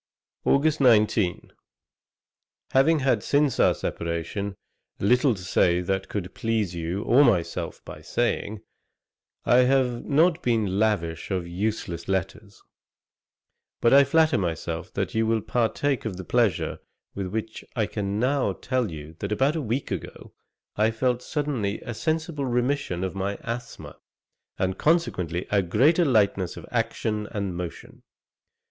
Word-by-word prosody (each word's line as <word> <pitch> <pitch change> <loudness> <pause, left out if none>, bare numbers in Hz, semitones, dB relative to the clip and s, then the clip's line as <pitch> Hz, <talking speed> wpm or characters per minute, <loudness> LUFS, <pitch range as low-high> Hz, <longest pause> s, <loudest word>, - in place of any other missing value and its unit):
August 150 +2 +3
19. 110 -6 +3 1.2
'Having 150 +4 +4
had 130 -5 +2
since 145 +1 +1
our - - +4
separation, 85 +4 -3 0.4
little 125 +4 +3
to 95 - -9
say 90 -1 +2
that 95 +2 -2
could 95 -3 -4
please 110 -5 -1
you 85 +4 -3
or 135 +4 +5
myself 100 -11 0
by - - -9
saying, 105 0 -2 0.8
I 120 - +5
have 125 -1 +3
not 165 +4 +3
been 110 -5 0
lavish 90 -7 0
of 95 -3 -1
useless 90 -2 -3
letters; 95 +2 -3 1.2
but 120 - +4
I 140 +1 +8
flatter 155 -2 +3
myself 85 +1 -3
that 95 -2 -2
you 110 0 +1
will 115 0 +2
partake 120 +4 0
of 100 -5 -3
the 95 - -7
pleasure 115 -3 +1 0.3
with 100 -1 -4
which 110 +3 -5
I 110 -3 +1
can 100 -1 -3
now 130 -4 +1
tell 125 +1 -1
you 80 -1 -9
that 100 - -4
about 135 +8 +2
a 160 - -1
week 125 +2 -2
ago, - - -6 0.4
I 110 +1 +3
felt 125 +2 0
suddenly 130 -9 -2
a 120 - -6
sensible 160 +2 -2
remission 125 -6 -1
of 95 - -2
my 95 +1 -2
asthma, 115 +1 -6 0.6
and 95 0 -1
consequently 95 - +1
a 100 -1 +4
greater 135 - +3
lightness 100 - +2
of - - -9
action 115 -2 -1
and 100 -5 -3
motion. 85 -1 -7
110 Hz, 140 wpm, -25 LUFS, 95-130 Hz, 1.2 s, I